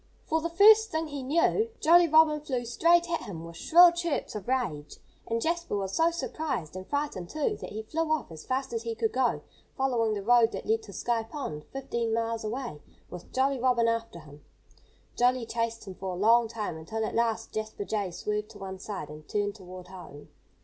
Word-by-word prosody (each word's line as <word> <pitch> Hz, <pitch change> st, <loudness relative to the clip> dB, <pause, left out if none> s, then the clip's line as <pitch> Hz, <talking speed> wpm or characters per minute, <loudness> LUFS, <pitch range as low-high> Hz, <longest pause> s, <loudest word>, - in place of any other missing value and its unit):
For 320 Hz, 0 st, 0 dB
the 335 Hz, -, -2 dB
first 430 Hz, +5 st, +7 dB
thing 315 Hz, 0 st, -2 dB
he 285 Hz, -2 st, -5 dB
knew, 335 Hz, -, +2 dB
Jolly 345 Hz, +2 st, +6 dB
Robin 310 Hz, -1 st, +5 dB
flew 255 Hz, -5 st, -3 dB
straight 340 Hz, +8 st, +3 dB
at 335 Hz, -, 0 dB
him 165 Hz, -5 st, -7 dB
with 170 Hz, 0 st, -10 dB
shrill 345 Hz, -, +7 dB
chirps 340 Hz, -3 st, -2 dB
of 210 Hz, -1 st, -7 dB
rage. 235 Hz, -, -2 dB, 0.3 s
And 230 Hz, 0 st, 0 dB
Jasper 340 Hz, -3 st, -1 dB
was 195 Hz, -1 st, -3 dB
so 325 Hz, +1 st, +4 dB
surprised 310 Hz, -, -4 dB
and 185 Hz, 0 st, -7 dB
frightened, 285 Hz, -12 st, -3 dB
too 310 Hz, +8 st, -1 dB
that -, -, -8 dB
he 220 Hz, +1 st, -6 dB
flew 315 Hz, +8 st, -2 dB
off 310 Hz, -, -1 dB
as 160 Hz, -1 st, -9 dB
fast 260 Hz, -1 st, -2 dB
as 230 Hz, -, -2 dB
he 230 Hz, -1 st, -4 dB
could 225 Hz, -1 st, 0 dB
go, 255 Hz, -1 st, +1 dB, 0.3 s
following 235 Hz, -5 st, +1 dB
the 200 Hz, -, -4 dB
road 235 Hz, +1 st, +4 dB
that -, -, -5 dB
led 445 Hz, +1 st, +1 dB
to 435 Hz, -, -12 dB
Sky 235 Hz, -1 st, 0 dB
Pond, 225 Hz, -, -6 dB
fifteen 235 Hz, -4 st, -3 dB
miles 230 Hz, 0 st, -2 dB
away, 220 Hz, -, -5 dB, 0.3 s
with 180 Hz, -1 st, -10 dB
Jolly 265 Hz, +1 st, +1 dB
Robin 240 Hz, -2 st, +3 dB
after 230 Hz, -7 st, -2 dB
him. 145 Hz, -1 st, -15 dB, 0.7 s
Jolly 245 Hz, 0 st, +2 dB
chased 230 Hz, 0 st, -3 dB
him 190 Hz, -, -7 dB
for 190 Hz, 0 st, -5 dB
a -, -, -6 dB
long 230 Hz, +3 st, +5 dB
time, 215 Hz, -7 st, -4 dB
until 220 Hz, +8 st, -3 dB
at -, -, -4 dB
last 230 Hz, -1 st, 0 dB
Jasper 215 Hz, -1 st, -4 dB
Jay 205 Hz, -3 st, -2 dB
swerved 210 Hz, +4 st, -3 dB
to 210 Hz, -, -13 dB
one 190 Hz, -1 st, -7 dB
side 195 Hz, -9 st, -6 dB
and 150 Hz, 0 st, -11 dB
turned 205 Hz, -1 st, -1 dB
toward 185 Hz, -2 st, -11 dB
home. 175 Hz, -6 st, -11 dB
230 Hz, 205 wpm, -28 LUFS, 200-295 Hz, 0.7 s, first